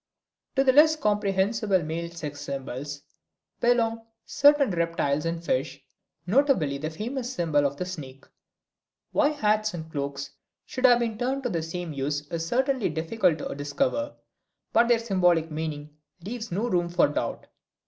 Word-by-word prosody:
To 270 Hz, -, +4 dB
the 260 Hz, -1 st, +4 dB
less 310 Hz, +3 st, +7 dB
comprehensible 205 Hz, -, +1 dB
male 165 Hz, +2 st, -4 dB
sex 150 Hz, -4 st, -7 dB
symbols 140 Hz, +1 st, -5 dB, 0.6 s
belong 230 Hz, -1 st, +1 dB, 0.2 s
certain 285 Hz, -3 st, +4 dB
reptiles 165 Hz, -4 st, 0 dB
and 165 Hz, 0 st, -3 dB
fish, 135 Hz, 0 st, -1 dB, 0.5 s
notably 190 Hz, -, +2 dB
the 155 Hz, +2 st, -3 dB
famous 240 Hz, -, -4 dB
symbol 155 Hz, -, +2 dB
of 140 Hz, 0 st, -7 dB
the 180 Hz, -, -3 dB
snake. 140 Hz, -7 st, -8 dB, 0.9 s
Why 295 Hz, -1 st, +3 dB
hats 215 Hz, -8 st, +1 dB
and 160 Hz, -1 st, -7 dB
cloaks 140 Hz, -1 st, -4 dB, 0.3 s
should 255 Hz, 0 st, +2 dB
have 245 Hz, -1 st, +6 dB
been 230 Hz, -2 st, -2 dB
turned 265 Hz, +2 st, -1 dB
to 245 Hz, -, 0 dB
the 170 Hz, -6 st, -1 dB
same 165 Hz, 0 st, -5 dB
use 145 Hz, +1 st, -2 dB
is 165 Hz, -1 st, -3 dB
certainly 260 Hz, -, +1 dB
difficult 160 Hz, +2 st, +1 dB
to -, -, -5 dB
discover, 270 Hz, -, -1 dB, 0.6 s
but 235 Hz, +1 st, +5 dB
their 240 Hz, -1 st, +5 dB
symbolic 180 Hz, -7 st, +2 dB
meaning 150 Hz, -1 st, -5 dB, 0.3 s
leaves 230 Hz, 0 st, -5 dB
no 205 Hz, +7 st, -1 dB
room 175 Hz, -5 st, +1 dB
for 170 Hz, -, +3 dB
doubt. 145 Hz, -, -3 dB
175 Hz, 150 wpm, -26 LUFS, 150-235 Hz, 0.9 s, less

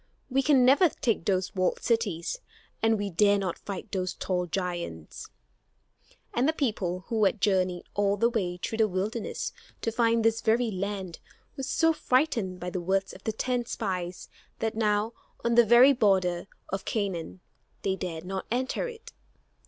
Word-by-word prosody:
We 270 Hz, +1 st, +3 dB
can 270 Hz, -2 st, +5 dB
never 285 Hz, +7 st, +6 dB
take 225 Hz, -, -1 dB
those 190 Hz, -1 st, 0 dB
walled 185 Hz, -1 st, 0 dB
cities, 225 Hz, -, 0 dB, 0.4 s
and 225 Hz, 0 st, +3 dB
we 205 Hz, -1 st, -3 dB
dare 205 Hz, +3 st, +4 dB
not 190 Hz, -3 st, -3 dB
fight 200 Hz, +1 st, -7 dB
those 185 Hz, -1 st, -2 dB
tall 180 Hz, -1 st, -1 dB
giants." 175 Hz, -, -4 dB, 1.1 s
And 255 Hz, +5 st, +2 dB
the -, -, +2 dB
people, 200 Hz, -, -1 dB
who 225 Hz, -3 st, +1 dB
had 205 Hz, +2 st, +1 dB
journeyed 185 Hz, -3 st, +1 dB
all 200 Hz, 0 st, +1 dB
the 230 Hz, -, +4 dB
way 180 Hz, -6 st, -1 dB
through 220 Hz, +5 st, -4 dB
the 220 Hz, -, +5 dB
wilderness 205 Hz, +4 st, -3 dB, 0.3 s
to 225 Hz, -, 0 dB
find 230 Hz, 0 st, +2 dB
this 225 Hz, 0 st, +3 dB
very 230 Hz, +1 st, +2 dB
land, 190 Hz, -2 st, -4 dB, 0.4 s
were -, -, -5 dB
so 325 Hz, +5 st, +2 dB
frightened 250 Hz, -11 st, +1 dB
by 180 Hz, 0 st, -4 dB
the 180 Hz, -, -3 dB
words 190 Hz, +2 st, 0 dB
of -, -, -13 dB
the 220 Hz, -, +1 dB
ten 245 Hz, +2 st, -1 dB
spies 185 Hz, -6 st, -3 dB, 0.3 s
that 225 Hz, 0 st, -1 dB
now, 215 Hz, 0 st, +1 dB, 0.3 s
on 235 Hz, -, +2 dB
the 240 Hz, 0 st, +7 dB
very 245 Hz, +5 st, +8 dB
border 190 Hz, -7 st, +2 dB, 0.2 s
of 195 Hz, 0 st, -3 dB
Canaan, 190 Hz, -5 st, -3 dB, 0.4 s
they 190 Hz, -, +1 dB
dared 175 Hz, -3 st, -5 dB
not 190 Hz, +1 st, -4 dB
enter 255 Hz, -, -1 dB
it. 460 Hz, -1 st, -10 dB
205 Hz, 170 wpm, -28 LUFS, 185-235 Hz, 1.1 s, very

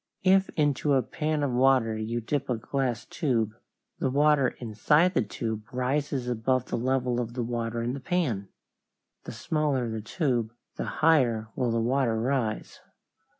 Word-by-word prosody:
If 190 Hz, +1 st, +4 dB
into 145 Hz, -1 st, +1 dB
a 130 Hz, -2 st, +3 dB
pan 155 Hz, -1 st, -2 dB
of 140 Hz, -, 0 dB
water 125 Hz, -3 st, +3 dB
you 110 Hz, +2 st, -3 dB
dip 140 Hz, +4 st, -2 dB
a 125 Hz, -, +1 dB
glass 125 Hz, 0 st, -2 dB
tube, 130 Hz, -, 0 dB, 0.5 s
the -, -, +1 dB
water 145 Hz, 0 st, +4 dB
inside 150 Hz, -, +2 dB
the -, -, +2 dB
tube 110 Hz, -1 st, -5 dB
rises 130 Hz, +1 st, -1 dB
above 125 Hz, +1 st, 0 dB
the -, -, -3 dB
level 125 Hz, 0 st, 0 dB
of 120 Hz, 0 st, -6 dB
the 125 Hz, -, -1 dB
water 115 Hz, 0 st, -2 dB
in 120 Hz, +2 st, -1 dB
the 140 Hz, -, -5 dB
pan. 130 Hz, -, -1 dB, 0.8 s
The -, -, -6 dB
smaller 135 Hz, -1 st, -1 dB
the 110 Hz, -1 st, -4 dB
tube 120 Hz, -, -1 dB, 0.2 s
the -, -, -3 dB, 0.2 s
higher 120 Hz, -9 st, +3 dB
will 125 Hz, -2 st, 0 dB
the 115 Hz, 0 st, +1 dB
water 120 Hz, -1 st, +1 dB
rise. 120 Hz, -3 st, -2 dB
125 Hz, 160 wpm, -27 LUFS, 115-140 Hz, 0.8 s, If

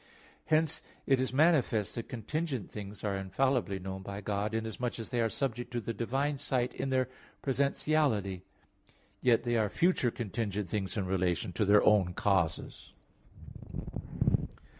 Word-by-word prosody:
Hence 155 Hz, -1 st, +2 dB, 0.2 s
it 135 Hz, -2 st, +3 dB
is 130 Hz, -, 0 dB
manifest 135 Hz, -, +3 dB
that 115 Hz, -, -5 dB
contingent 130 Hz, -, -3 dB
things 105 Hz, -1 st, -7 dB
are 100 Hz, -2 st, 0 dB
infallibly 105 Hz, +2 st, 0 dB
known 95 Hz, 0 st, -5 dB
by 100 Hz, +1 st, -6 dB
God, 105 Hz, +1 st, -1 dB
inasmuch 115 Hz, +2 st, -2 dB
as 115 Hz, -, -5 dB
they 120 Hz, -2 st, 0 dB
are 115 Hz, -, +2 dB
subject 120 Hz, -1 st, -2 dB
to 120 Hz, -, 0 dB
the 115 Hz, 0 st, -3 dB
divine 135 Hz, +5 st, -1 dB
sight 130 Hz, -3 st, 0 dB
in 135 Hz, -, -3 dB
their 130 Hz, -1 st, +2 dB, 0.4 s
presentiality; 135 Hz, -, +1 dB, 0.8 s
yet 120 Hz, -2 st, +4 dB
they 120 Hz, -1 st, +1 dB
are 105 Hz, -2 st, +2 dB
future 170 Hz, -, +2 dB
contingent 105 Hz, -4 st, -3 dB
things 100 Hz, +1 st, -2 dB
in 100 Hz, -, 0 dB
relation 90 Hz, -1 st, 0 dB
to 105 Hz, -, +1 dB
their 105 Hz, +1 st, +6 dB
own 95 Hz, -4 st, +4 dB
causes. 95 Hz, -5 st, 0 dB
115 Hz, 145 wpm, -31 LUFS, 100-130 Hz, 0.8 s, their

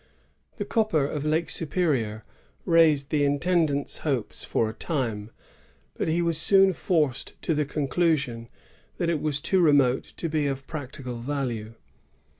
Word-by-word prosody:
^ -, -, -36 dB
The -, -, -3 dB
copper 215 Hz, -, +1 dB
of 145 Hz, 0 st, -3 dB
Lake 160 Hz, +2 st, +1 dB
Superior 140 Hz, -, -1 dB, 0.4 s
raised 155 Hz, -5 st, +4 dB
the 150 Hz, -2 st, +2 dB
intendant's 145 Hz, 0 st, +1 dB
hopes 135 Hz, -8 st, -2 dB
for 115 Hz, -, 0 dB
a 110 Hz, -, -5 dB
time, 115 Hz, -7 st, -3 dB, 0.6 s
but -, -, -3 dB
he 170 Hz, +2 st, +1 dB
was 165 Hz, -2 st, +2 dB
soon 195 Hz, +2 st, +5 dB
forced 155 Hz, -7 st, -1 dB
to 165 Hz, -, +1 dB
the 150 Hz, -1 st, 0 dB
conclusion 140 Hz, -5 st, -1 dB, 0.5 s
that 170 Hz, -1 st, 0 dB
it 160 Hz, -, -1 dB
was 150 Hz, -2 st, +1 dB
too 190 Hz, +6 st, +1 dB
remote 140 Hz, -6 st, +4 dB, 0.2 s
to 170 Hz, -, -2 dB
be 155 Hz, -2 st, 0 dB
of 135 Hz, -1 st, -4 dB
practical 130 Hz, -5 st, -7 dB
value. 120 Hz, -4 st, -4 dB
145 Hz, 150 wpm, -26 LUFS, 130-165 Hz, 0.6 s, soon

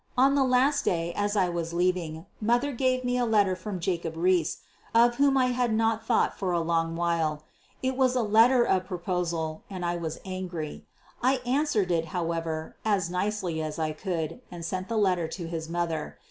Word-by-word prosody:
On 270 Hz, +2 st, +5 dB
the 280 Hz, -1 st, +3 dB
last 265 Hz, +3 st, +3 dB
day, 170 Hz, -1 st, 0 dB
as 205 Hz, +1 st, 0 dB
I 190 Hz, -3 st, +3 dB
was 170 Hz, -1 st, -3 dB
leaving, 175 Hz, -3 st, 0 dB, 0.2 s
mother 240 Hz, +6 st, +2 dB
gave 255 Hz, 0 st, +1 dB
me 250 Hz, 0 st, 0 dB
a -, -, +2 dB
letter 205 Hz, -4 st, +3 dB
from 185 Hz, +1 st, -5 dB
Jacob 170 Hz, -2 st, -2 dB
Riis, 175 Hz, -1 st, +1 dB, 0.3 s
of 240 Hz, +1 st, +5 dB
whom 280 Hz, -1 st, +4 dB
I 255 Hz, -1 st, +3 dB
had 245 Hz, -1 st, +1 dB
not 225 Hz, 0 st, +1 dB
thought 235 Hz, -, +2 dB
for 190 Hz, -2 st, -2 dB
a 175 Hz, -, +2 dB
long 165 Hz, 0 st, 0 dB
while. 165 Hz, -3 st, 0 dB, 0.4 s
It 260 Hz, 0 st, 0 dB
was 255 Hz, -1 st, +2 dB
a 250 Hz, -, +2 dB
letter 230 Hz, +4 st, +5 dB
of 185 Hz, -4 st, +1 dB
proposal, 170 Hz, -3 st, -2 dB
and 185 Hz, -3 st, -4 dB
I 175 Hz, 0 st, 0 dB
was 160 Hz, -2 st, -4 dB
angry. 185 Hz, -5 st, -5 dB, 0.3 s
I 260 Hz, +2 st, +3 dB
answered 250 Hz, -8 st, +1 dB
it, 165 Hz, -1 st, +1 dB
however, 165 Hz, -1 st, -3 dB
as 195 Hz, -5 st, +1 dB
nicely 180 Hz, -3 st, -1 dB
as 155 Hz, -1 st, -4 dB
I 155 Hz, -1 st, -1 dB
could, 165 Hz, +4 st, -4 dB
and 170 Hz, -2 st, -7 dB
sent 185 Hz, +2 st, -3 dB
the 230 Hz, -, -1 dB
letter 180 Hz, -5 st, +2 dB
to 170 Hz, +1 st, -6 dB
his 165 Hz, -1 st, -5 dB
mother. 165 Hz, -3 st, -2 dB
185 Hz, 190 wpm, -27 LUFS, 165-230 Hz, 0.4 s, On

